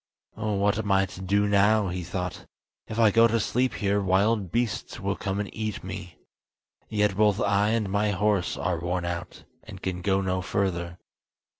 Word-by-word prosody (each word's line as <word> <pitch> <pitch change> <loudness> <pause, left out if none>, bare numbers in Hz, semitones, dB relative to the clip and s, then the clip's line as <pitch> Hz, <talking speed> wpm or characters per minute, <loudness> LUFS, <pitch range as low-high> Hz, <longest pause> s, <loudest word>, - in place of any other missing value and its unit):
"What 105 -1 0
am 105 -2 -2
I 95 0 +4
to 95 0 -10
do 100 +2 +2
now?" 100 0 +3
he 90 0 -4
thought. 90 +1 -5 0.4
"If 110 - -6
I 110 -2 +5
go 115 +3 +6
to 115 0 +1
sleep 125 +4 0
here 100 -1 +1
wild 100 0 +1
beasts 115 -3 -2
will 100 +1 -1
come 95 0 -3
and 105 - -4
eat 110 -2 -4
me! 90 -3 -7 0.7
Yet 105 -2 +1
both 105 0 +3
I 100 +1 +2
and 110 -2 0
my 100 +2 +1
horse 100 -2 +1
are 90 -2 -1
worn 90 +1 -2
out, 85 0 -5 0.2
and - - -10
can 90 -1 -3
go 95 +1 +2
no 95 -1 -1
further." 90 -2 -2
100 Hz, 180 wpm, -26 LUFS, 95-105 Hz, 0.7 s, go